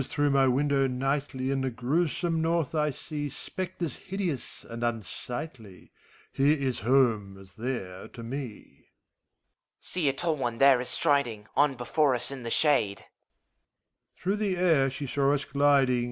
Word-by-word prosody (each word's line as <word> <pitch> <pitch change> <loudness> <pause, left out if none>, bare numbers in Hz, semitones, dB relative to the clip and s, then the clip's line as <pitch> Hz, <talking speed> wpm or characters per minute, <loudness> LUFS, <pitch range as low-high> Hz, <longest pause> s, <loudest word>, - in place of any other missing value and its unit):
If, - - -4
as - - -12
through 145 0 +2
my 135 -1 +4
window 135 +1 +2
nightly 135 +1 -1
In 135 -1 0
the 130 - 0
grewsome 160 +7 0
North, 165 -2 0
I 150 -1 +1
see 145 +1 -5
Spectres 175 +2 -5
hideous 185 - -4
and 115 0 -7
unsightly, 120 - -5 0.4
Here 145 +3 +3
is 130 -3 -2
home, 110 -5 +2
as 95 -1 -16
there, 110 -6 -4
to 115 - -10
me. 135 +3 -4
HOMUNCULUS. 105 - -17 0.9
See! 170 -6 0
a - - 0
tall 160 +2 -1
one 120 -3 -2
there 135 -1 +6
is 125 - -3
striding 120 -9 +1
On 145 -2 +3
before 130 +3 +2
us, 125 +2 -2
in 135 -2 -6
the 120 - -5
shade. 115 -8 +2
MEPHISTOPHELES. - - -32
Through 195 +3 +1
the 200 -4 0
air 160 -7 +3
she 135 +2 -5
saw 140 +1 +2
us 140 - -3
gliding. 140 -3 +3
135 Hz, 170 wpm, -28 LUFS, 120-150 Hz, 0.9 s, there